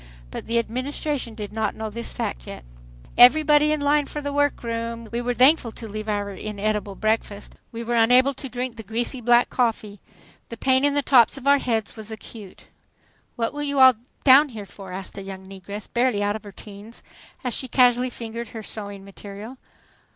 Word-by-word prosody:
But - - -7
the 230 +1 0
Administration 255 +1 -2
did 210 -2 -7
not 220 -2 -1
know 220 -1 -5
this 235 +2 -5
fact - - -4
yet. - - -9 0.5
"Everybody 300 +4 +7
in 305 - 0
line 290 0 +2
for 295 - -5
the 285 -1 -4
work 290 -2 +1
room!" 230 0 -4
We 235 +1 -2
were 245 0 -2
thankful 255 -2 +4
to 225 - -8
leave 215 +1 -6
our 205 -1 -2
inedible 210 0 -3
breakfast. 215 -1 -2 0.2
We 230 -1 -6
were 235 +1 -3
unable 250 +4 +5
to 270 0 -6
drink 245 -1 -4
the - - -6
greasy 235 +4 -3
black 240 +1 +4
coffee. 220 -4 -1 0.5
The 230 - -7
pain 260 +2 +3
in 285 0 +2
the 285 - +1
tops 255 -1 +5
of 270 - -10
our 280 0 +5
heads 225 -5 -2
was 220 -1 -9
acute. 215 -2 -10 0.7
"What 230 +2 -2
you 285 -1 0
all 260 -1 +9 0.3
down 280 +2 +7
here 215 -5 -8
for?" 195 -1 -12
asked 190 +2 -7
a - - -6
young 190 -1 -9
negress, 195 +2 -8
barely 240 -4 +1
out 205 0 0
of 220 - -8
her 205 - -9
teens, 205 +3 -12 0.4
as 250 -2 -2
she 260 - -3
casually 250 0 +3
fingered 235 -1 -7
her 220 -1 -8
sewing 200 -2 -7
material. 205 +5 -10
230 Hz, 195 wpm, -23 LUFS, 210-255 Hz, 0.7 s, all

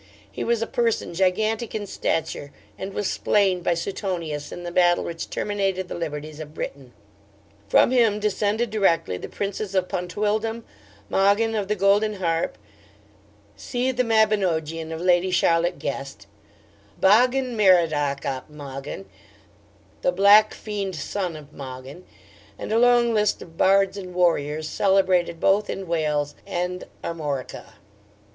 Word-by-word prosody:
He - - -4
was 230 -1 +1
a - - -1
person 230 -6 -1
gigantic 215 +6 0
in 210 -1 -3
stature, 160 -6 -2 0.2
and 190 +1 -6
was 205 0 -2
slain 195 -3 +1
by 175 0 +1
Suetonius 170 -5 -4
in 175 - -7
the 175 - -5
battle 175 0 +3
which 165 -1 -5
terminated 195 -3 -1
the - - -4
liberties 155 -2 -5
of 155 0 -9
Britain. 135 -5 -6 0.8
From 235 - +5
him 230 -5 +3
descended 210 +2 0
directly 180 - +1
the - - -8
Princes 200 0 -4
of 185 -1 +2
Pontydwdlm, 215 +5 -2 0.4
Mogyn 205 - +2
of 210 -3 -1
the 210 - 0
Golden 205 +2 +2
Harp 165 - -1 1.0
(see 255 0 -2
the 250 -1 0
Mabinogion 185 -8 +1
of 160 0 -5
Lady 180 0 +3
Charlotte 175 -1 +2
Guest,) 135 -7 -5 0.7
Bogyn 250 +5 +4
Merodac 160 -9 +3
ap 130 0 -4
Mogyn, 140 -8 -8 1.0
(the - - +2
black 200 +3 +6
fiend 200 -3 -4
son 175 +3 -3
of 150 -1 -12
Mogyn,) 135 +5 -9 0.5
and - - -6
a 225 - +3
long 240 -1 +4
list 210 -1 +1
of 165 - -16
bards 195 +2 +3
and 180 -2 -8
warriors, 155 -3 +1
celebrated 185 -3 +2
both 205 +4 +2
in 195 - -4
Wales 150 -3 0
and 180 +1 -3 0.2
Armorica. 150 -6 -5
185 Hz, 140 wpm, -24 LUFS, 160-210 Hz, 1.0 s, black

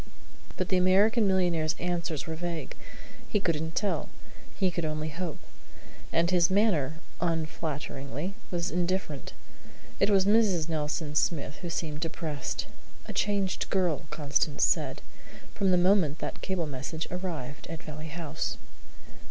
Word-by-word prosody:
But 185 - -1
the 185 - +4
American 200 +5 +5
millionaire's 175 -4 +2
answers 170 -3 -1
were 165 - -3
vague. 170 0 -4 0.5
He 210 - +2
couldn't 160 -3 -1
tell. 205 -1 0 0.5
He 190 -2 +2
could 170 -1 -2
only 155 0 -1
hope. 165 0 -4 0.7
And 170 +2 +3
his 175 -2 +5
manner, 185 -8 +3 0.2
unflatteringly, 155 -2 -2 0.2
was 175 -1 -1
indifferent. 175 -5 -1 0.7
It - - +4
was 195 -2 +5
Mrs. 200 -6 +4
Nelson 150 -1 -1
Smith 150 -1 +1
who 175 - -5
seemed 155 -2 -2
depressed; 160 -3 -3 0.4
"a - - -6
changed 200 -2 0
girl," 175 -6 +1
Constance 150 -1 +1
said, - - +1 0.5
"from 195 - +2
the 180 - +5
moment 175 -5 +4
that - - -5
cable 185 -3 -1
message 145 +3 -4
arrived 170 -7 -4
at 165 +1 -6
Valley 155 0 -6
House." 160 0 -3
170 Hz, 135 wpm, -29 LUFS, 155-185 Hz, 0.7 s, American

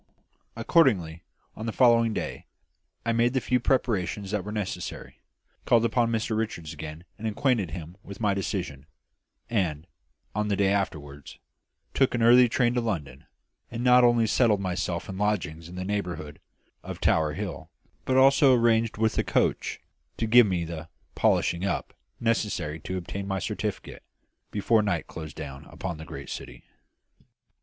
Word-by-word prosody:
Accordingly, 90 - +2 0.3
on 110 - -6
the - - -1
following 115 -1 +4
day - - -5 0.6
I 115 - +2
made 120 +2 +2
the 130 - +2
few 125 0 +1
preparations 105 -6 0
that 105 -3 -1
were 105 - -6
necessary; 105 -3 -5 0.4
called 115 -1 +4
upon 115 0 +2
Mr 110 -1 -1
Richards 85 -8 -3
again 80 +1 -8 0.2
and 110 - -3
acquainted 110 - +1
him 85 +1 -8
with 100 -1 -10
my 105 -3 +2
decision, 90 -8 -4 0.6
and, 85 -9 -1 0.5
on 105 0 -1
the 105 - +1
day 100 0 +2
afterwards, 75 -8 -3 0.6
took 135 -2 +2
an 120 - +1
early 120 +1 +7
train 120 0 +2
to 120 - +1
London, 85 -12 -4 0.4
and 120 +1 -5
not 125 0 +6
only 120 -1 +4
settled 110 -2 +3
myself 90 -2 -2
in 95 0 -6
lodgings 85 -6 -1
in 90 - -10
the 90 0 -4
neighbourhood 90 -7 -4 0.4
of - - -7
Tower 75 -1 +2
Hill, - - -6 0.3
but 130 - +1
also 135 0 +6
arranged 115 -2 +2
with 110 0 +1
a - - +2
"coach" - - 0 0.4
to 115 - 0
give 120 0 +7
me 90 -3 -1
the 85 0 -7 0.2
"polishing 85 +1 +1
up" 100 - -2 0.3
necessary 105 -9 -1
to 95 +4 -5
obtain 100 +2 -5
my 95 -1 -1
certificate, 95 - -4 0.5
before 110 +2 +2
night 90 -6 -1
closed 80 -2 -8
down 70 -3 -8
upon 90 -4 -6
the 80 - -8
great - - -8
city. - - -8
100 Hz, 160 wpm, -27 LUFS, 85-115 Hz, 0.6 s, early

